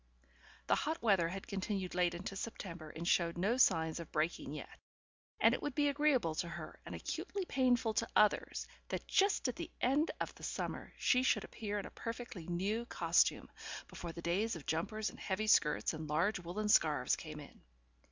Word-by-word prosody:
The - - +3
hot 320 +2 0
weather 195 -7 +4
had 195 +2 -6
continued 195 -1 -3
late 175 -1 +2
into 195 +3 -5
September 180 -6 -6
and 165 +3 -6
showed 170 -1 +2
no 205 +8 +1
signs 160 -9 +3
of 170 - -8
breaking 155 -2 -1
yet, 150 - -8 0.6
and - - +6
it - - -1
would 290 -3 -3
be 290 -1 +3
agreeable 280 - +2
to 170 - -2
her 170 -2 -7
and - - -5
acutely 395 -2 -3
painful 250 -6 +2
to 230 +2 0
others 210 -1 +3 0.2
that - - -3
just 390 -6 +3
at 250 - -3
the - - -5
end 280 +6 +2
of - - -3
the - - -17
summer - - -4
she 250 - +4
should 260 - +2
appear 210 -2 -4
in 200 - -3
a - - -8
perfectly 230 -7 -6
new 200 +7 -1
costume, - - +2 0.4
before 170 - -6
the 170 +1 -9
days 200 +6 +1
of 160 - -8
jumpers 210 +7 -1
and - - -14
heavy 205 +3 -1
skirts 165 -7 +3
and 155 -1 -6
large 175 +7 +2
woollen 180 +5 -3
scarves 150 -9 +4
came 155 -2 -8
in. 145 - -13
195 Hz, 190 wpm, -35 LUFS, 170-230 Hz, 0.6 s, and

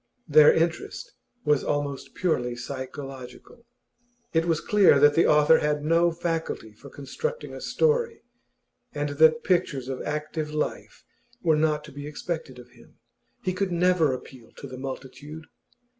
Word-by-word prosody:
Their 150 -1 +7
interest 395 - -2 0.3
was 150 -2 +2
almost 145 -2 -3
purely 125 -9 0
psychological. 130 - -8 0.7
It 165 0 +2
was 165 -2 +1
clear 200 -9 +4
that 145 +1 +6
the 165 - +3
author 150 +1 +5
had 150 0 -1
no 170 +2 +3
faculty 165 -9 -4
for 140 +6 -14
constructing 470 - -5
a - - -8
story, 470 -1 0 0.7
and 145 0 -1
that 155 +2 +4
pictures 170 -9 0
of 130 - -4
active 150 0 -3
life 150 0 -4 0.4
were 160 -2 +4
not 150 -1 +1
to 150 - -12
be 145 +1 -8
expected 150 -3 -5
of 125 -1 -14
him; 120 -1 -20 0.5
he 185 - -1
could 185 0 -2
never 175 -3 +3
appeal 130 -2 -9
to - - -11
the 130 -2 -8
multitude. 135 +4 -8
150 Hz, 145 wpm, -26 LUFS, 135-170 Hz, 0.7 s, Their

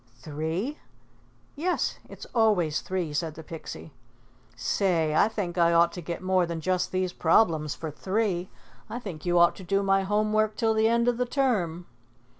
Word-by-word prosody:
"Three?" 160 - -4 0.8
"Yes, 350 +5 -1
it's - - -10
always 200 -10 +2
three," 180 -5 -3
said 155 +1 -2
the 160 - -9
Pixie. 115 - -9 0.6
"Say, 165 -6 +1
I 160 - +4
think 190 -6 -3
I 170 0 +4
ought 170 0 +5
to 175 - -6
get 170 +2 -5
more 185 -1 +2
than 170 -1 -4
just 180 +3 -1
these 185 -1 -1
problems 160 -4 +2
for 160 -2 -6
three. 190 +1 -1 0.4
I 235 - -4
think 185 -9 -7
you 175 0 +3
ought 170 0 +5
to 190 - -9
do 195 +3 0
my 195 0 +3
home 210 +2 0
work 215 0 +2
till 225 -1 +1
the 220 0 +3
end 235 +1 +2
of 245 -1 +2
the 250 0 0
term." 205 - 0
185 Hz, 180 wpm, -27 LUFS, 165-215 Hz, 0.8 s, ought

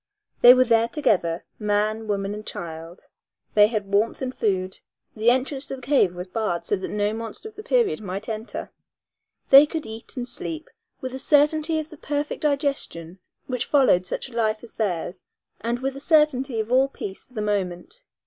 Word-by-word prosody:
They 245 +1 +10
were 255 - +5
there 230 -2 +3
together, 190 - 0
man, 215 +1 0
woman 200 -1 -1
and 210 0 -7
child. 165 -2 -7 0.5
They 210 0 +7
had 210 -3 -4
warmth 210 +3 +2
and 255 0 -3
food. 190 -5 -1 0.4
The 220 +2 +3
entrance 265 +3 0
to - - -4
the 260 - -12
cave 245 -10 +3
was 180 0 -5
barred 190 -2 -2
so - - +1
that 190 - -5
no 210 0 0
monster 225 - -7
of 430 - -21
the - - -8
period 470 - +1
might 195 0 -5
enter. 220 +1 -5 0.8
They 275 +2 +10
could 320 0 -4
eat 225 +4 -9
and 245 -1 -3
sleep 320 +5 -6 0.3
with 255 -1 -5
a 265 - -5
certainty 300 +3 +3
of 315 +1 -4
the 315 - -11
perfect 290 +1 -3
digestion 275 - -2 0.3
which 255 -1 -2
followed 255 -11 +4
such - - -3
a 255 - -15
life 220 -1 0
as 235 - -12
theirs 180 -3 -2 0.4
and 235 +2 -1
with 265 +2 -3
a - - -7
certainty 280 -6 +2
of 220 +2 -3
all 260 +2 +5
peace 195 -7 -7
for 255 - -23
the 215 - -2
moment. 200 - -3
230 Hz, 190 wpm, -24 LUFS, 205-275 Hz, 0.8 s, They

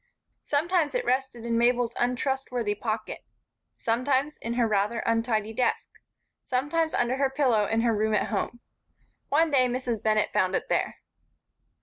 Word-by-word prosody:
Sometimes 320 +3 0
it - - 0
rested 255 -2 -1
in 230 0 +1
Mabel's 240 0 +2
untrustworthy 250 -3 -1
pocket, 215 +1 -4 0.5
sometimes 260 +5 0
in 235 +1 -4
her 240 -2 +2
rather 210 +2 0
untidy 225 -1 0
desk, 250 +2 0 0.5
sometimes 305 +5 0
under 245 +2 +1
her 275 -1 +2
pillow 260 -6 +2
in 225 +1 +1
her 235 0 +2
own - - -1
room 215 0 +2
at - - 0
home. 235 +3 -3 0.7
One 315 +2 +3
day 255 -3 +4
Mrs. 245 -3 -2
Bennett 215 -1 +1
found 185 0 +2
it - - -2
there. - - -1
240 Hz, 150 wpm, -27 LUFS, 225-270 Hz, 0.7 s, day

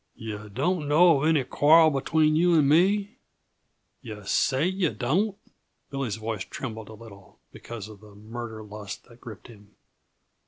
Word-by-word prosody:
"Yuh 105 -1 -7
don't 150 - -1
know 155 0 +5
of 155 - +1
any 155 -4 +3
quarrel 155 +5 +5
between 155 +2 +1
you 175 +2 +3
and 150 -3 +4
me? 195 +7 +2 0.8
Yuh 105 -2 -9
say 130 - +1
yuh 185 -2 0
don't?" 190 - -1 0.5
Billy's 135 -7 -3
voice 110 -3 -4
trembled 110 -5 -7
a - - -10
little, 105 -3 -15
because 115 -3 -9
of 105 -2 -13
the 105 -1 -16
murder 110 +1 -8
lust 105 -1 -9
that 120 0 -20
gripped 110 -4 -11
him. 105 -3 -17
120 Hz, 155 wpm, -26 LUFS, 110-160 Hz, 0.8 s, know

